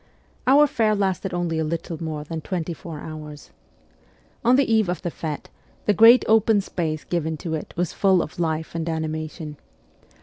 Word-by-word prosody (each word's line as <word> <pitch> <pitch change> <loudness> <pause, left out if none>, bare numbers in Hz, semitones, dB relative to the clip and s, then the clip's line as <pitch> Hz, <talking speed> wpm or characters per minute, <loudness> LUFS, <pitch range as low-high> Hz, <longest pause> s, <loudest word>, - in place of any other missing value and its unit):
Our 285 +3 +7
fair 220 -6 +1
lasted 195 -1 -1
only 175 -2 -1
a - - +1
little 165 +1 -4
more 155 -2 -4
than 160 +1 -5
twenty 175 0 -3
four 160 -1 -8
hours. 150 -2 -9 0.9
On 245 +2 +5
the 275 +1 +4
eve 220 -4 +2
of 180 -2 -3
the 175 - -2
fete, 155 -2 -5 0.4
the 210 - +4
great 230 +4 +7
open 220 -1 +4
space 160 -5 -3
given 160 -2 -2
to 160 +2 -5
it 155 - -4
was 175 -1 -1
full 190 -3 +3
of 155 - -10
life 160 -1 -1
and 165 0 -3
animation. 155 -1 -4
165 Hz, 175 wpm, -23 LUFS, 155-195 Hz, 0.9 s, Our